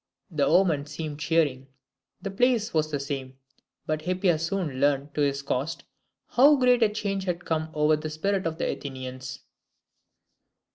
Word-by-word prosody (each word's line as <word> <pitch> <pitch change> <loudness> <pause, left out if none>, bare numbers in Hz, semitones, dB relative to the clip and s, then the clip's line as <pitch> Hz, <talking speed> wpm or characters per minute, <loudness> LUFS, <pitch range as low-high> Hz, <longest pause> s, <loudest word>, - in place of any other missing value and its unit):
The 145 -4 +1
omen 160 -7 +3
seemed 150 0 -6
cheering. 145 -4 +1 0.6
The 195 - -3
place 235 +1 +2
was 155 -1 +1
the 145 -2 -2
same; 135 -2 -5 0.5
but 155 0 -1
Hippias 180 -2 +1
soon 170 -8 -2
learned 145 0 +1
to 150 - -1
his 140 -1 +1
cost 140 +3 -2 0.5
how 280 +4 +6
great 250 -2 +4
a 220 - +5
change 200 -2 -2
had 175 -1 -3
come 160 -1 -1
over 150 +1 +4
the 155 +1 -5
spirit 190 +4 -1
of 160 0 -4
the - - -1
Athenians. 130 -1 -6
155 Hz, 155 wpm, -26 LUFS, 140-190 Hz, 0.6 s, how